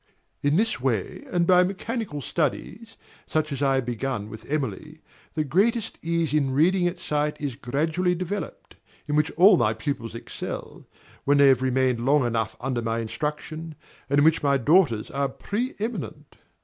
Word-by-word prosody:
In 145 Hz, +1 st, +2 dB
this 220 Hz, +4 st, +1 dB
way, 120 Hz, -7 st, -2 dB
and 175 Hz, -1 st, +2 dB
by 180 Hz, 0 st, +6 dB
mechanical 195 Hz, -, -3 dB
studies, 210 Hz, -, -3 dB, 0.3 s
such 155 Hz, -1 st, -1 dB
as 140 Hz, -1 st, -4 dB
I 135 Hz, -1 st, +3 dB
have 130 Hz, -2 st, 0 dB
begun 120 Hz, -3 st, -3 dB
with 110 Hz, +3 st, -11 dB
Emily, 150 Hz, +2 st, -3 dB, 0.4 s
the 155 Hz, -, +1 dB
greatest 205 Hz, -, +1 dB
ease 165 Hz, -2 st, 0 dB
in 140 Hz, -3 st, +1 dB
reading 175 Hz, +4 st, +3 dB
at 175 Hz, -, -3 dB
sight 150 Hz, 0 st, -1 dB
is 145 Hz, -3 st, -3 dB
gradually 160 Hz, +9 st, 0 dB
developed, 185 Hz, 0 st, -5 dB, 0.3 s
in 145 Hz, -, 0 dB
which 150 Hz, +1 st, +3 dB
all 190 Hz, +2 st, +7 dB
my 110 Hz, -5 st, +2 dB
pupils 115 Hz, 0 st, -4 dB
excel, 115 Hz, -, -7 dB, 0.4 s
when 145 Hz, +1 st, +3 dB
they 140 Hz, -1 st, +7 dB
have 130 Hz, -2 st, +4 dB
remained 130 Hz, -2 st, +1 dB
long 140 Hz, 0 st, +3 dB
enough 115 Hz, -2 st, -1 dB
under 130 Hz, -2 st, -2 dB
my 115 Hz, 0 st, -1 dB
instruction, 150 Hz, +6 st, -4 dB, 0.3 s
and 140 Hz, -, +2 dB
in 145 Hz, -, +5 dB
which 160 Hz, 0 st, +4 dB
my 140 Hz, -2 st, +3 dB
daughters 135 Hz, -, +3 dB
are 140 Hz, 0 st, 0 dB
pre 230 Hz, -, -3 dB
eminent. 180 Hz, -9 st, -5 dB
150 Hz, 170 wpm, -25 LUFS, 130-170 Hz, 0.4 s, all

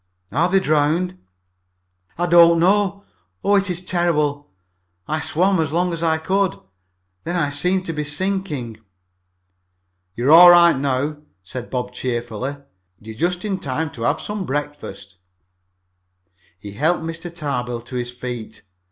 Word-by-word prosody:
"Are 165 Hz, +8 st, +1 dB
they 195 Hz, +1 st, +4 dB
drowned?" 165 Hz, +3 st, 0 dB, 1.0 s
"I 175 Hz, -, 0 dB
don't 170 Hz, -1 st, +6 dB
know! 200 Hz, +2 st, +2 dB, 0.4 s
Oh, 200 Hz, -, +2 dB
it 195 Hz, -1 st, +2 dB
is 180 Hz, 0 st, -2 dB
terrible! 150 Hz, -5 st, 0 dB, 0.6 s
I 155 Hz, +1 st, -1 dB
swam 185 Hz, +4 st, +1 dB
as 155 Hz, -3 st, 0 dB
long 175 Hz, +2 st, 0 dB
as 165 Hz, -, -4 dB
I 160 Hz, -1 st, +2 dB
could, 190 Hz, +3 st, 0 dB, 0.6 s
then 170 Hz, +2 st, -3 dB
I 145 Hz, -5 st, 0 dB
seemed 180 Hz, +6 st, 0 dB
to 165 Hz, -, -3 dB
be 150 Hz, -1 st, -3 dB
sinking." 150 Hz, -, -3 dB, 1.4 s
"You're 125 Hz, +5 st, +1 dB
all 175 Hz, +2 st, +10 dB
right 175 Hz, -1 st, +7 dB
now," 140 Hz, +2 st, -1 dB, 0.3 s
said 120 Hz, +6 st, -7 dB
Bob 125 Hz, -1 st, -3 dB
cheerfully. 120 Hz, +1 st, -3 dB, 0.4 s
"You're 110 Hz, +1 st, -10 dB
just 175 Hz, -, -1 dB
in 195 Hz, -2 st, -2 dB
time 150 Hz, +2 st, -3 dB
to 115 Hz, -, -11 dB
have 145 Hz, +6 st, +1 dB
some 210 Hz, -1 st, -4 dB
breakfast." 135 Hz, -, -5 dB, 1.4 s
He 100 Hz, +2 st, -9 dB
helped 160 Hz, -, 0 dB
Mr. 165 Hz, +1 st, -6 dB
Tarbill 125 Hz, -7 st, -3 dB
to 120 Hz, +2 st, -10 dB
his 120 Hz, -1 st, -3 dB
feet. 125 Hz, -3 st, -7 dB
155 Hz, 145 wpm, -21 LUFS, 130-175 Hz, 1.4 s, all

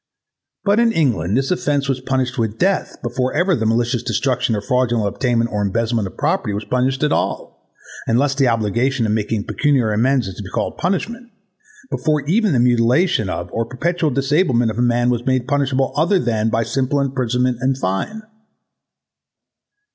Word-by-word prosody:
But 205 Hz, +2 st, +3 dB
in 235 Hz, -1 st, +4 dB
England 115 Hz, -, +1 dB
this 135 Hz, +3 st, 0 dB
offence 145 Hz, -5 st, 0 dB
was 135 Hz, -2 st, -1 dB
punished 130 Hz, -1 st, -1 dB
with 110 Hz, -1 st, -1 dB
death 195 Hz, +1 st, 0 dB
before 125 Hz, +1 st, -2 dB
ever 175 Hz, +3 st, +2 dB
the 110 Hz, -5 st, -1 dB
malicious 120 Hz, +1 st, +1 dB
destruction 125 Hz, 0 st, 0 dB
or 105 Hz, -, -2 dB
fraudulent 120 Hz, -2 st, +1 dB
obtainment 120 Hz, +2 st, 0 dB
or 105 Hz, -, 0 dB
embezzlement 110 Hz, +1 st, 0 dB
of -, -, -13 dB
property 105 Hz, -, 0 dB
was 105 Hz, +1 st, -4 dB
punished 130 Hz, +2 st, 0 dB
at 150 Hz, -, +2 dB
all, -, -, -3 dB, 0.4 s
unless 135 Hz, +5 st, +2 dB
the 135 Hz, -1 st, +2 dB
obligation 115 Hz, +3 st, 0 dB
of 105 Hz, -, 0 dB
making 105 Hz, 0 st, -1 dB
pecuniary 130 Hz, -7 st, +1 dB
amends 125 Hz, +1 st, +2 dB
is 95 Hz, -, -6 dB
to -, -, -8 dB
be -, -, -8 dB
called -, -, -2 dB
a -, -, -15 dB
punishment; 230 Hz, +7 st, -2 dB, 0.6 s
before 155 Hz, -2 st, 0 dB
even 195 Hz, +8 st, +1 dB
the 130 Hz, -, +2 dB
mutilation 120 Hz, -, +2 dB
of' 90 Hz, -1 st, -4 dB
or 115 Hz, -, -1 dB
the 115 Hz, -, -12 dB
perpetual 165 Hz, +5 st, -1 dB
disablement 135 Hz, -3 st, +1 dB
of 110 Hz, -, -6 dB
a -, -, +3 dB
man 120 Hz, 0 st, +2 dB
was 120 Hz, -1 st, -1 dB
made 130 Hz, -1 st, +1 dB
punishable 135 Hz, -2 st, 0 dB
otherwise 175 Hz, +1 st, +2 dB
than 110 Hz, -2 st, +1 dB
by 115 Hz, +1 st, +1 dB
simple 135 Hz, +5 st, -1 dB
imprisonment 125 Hz, -2 st, 0 dB
and 130 Hz, 0 st, +1 dB
fine. 95 Hz, -, -3 dB
125 Hz, 180 wpm, -19 LUFS, 115-140 Hz, 0.6 s, in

